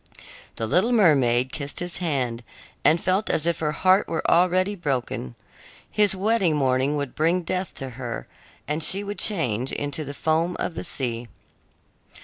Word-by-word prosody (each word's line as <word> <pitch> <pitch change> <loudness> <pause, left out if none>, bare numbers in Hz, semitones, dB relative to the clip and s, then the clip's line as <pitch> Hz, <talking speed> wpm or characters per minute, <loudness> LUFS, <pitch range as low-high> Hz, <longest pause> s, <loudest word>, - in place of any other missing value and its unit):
The 115 - -2
little 185 - +2
mermaid 130 - +3
kissed 145 -2 -4
his 175 -1 -2
hand 130 -9 -2 0.4
and 165 - +4
felt 190 +5 0
as 155 - 0
if 170 0 +1
her 150 -1 0
heart 185 +5 +3
were 165 - -2
already 185 +3 +3
broken. 130 - -3 0.6
His 205 -2 +3
wedding 195 -4 +2
morning 135 0 +1
would 140 -3 -4
bring 170 +3 +1
death 180 +1 -3
to 135 - -6
her, 120 -1 -6 0.4
and 150 +1 -1
she 195 +5 +1
would 205 +1 -5
change 130 - +1
into 145 +2 -3
the 140 0 -7
foam 165 +4 0
of - - -2
the - - -5
sea. 120 -3 -3
160 Hz, 160 wpm, -24 LUFS, 130-185 Hz, 0.6 s, and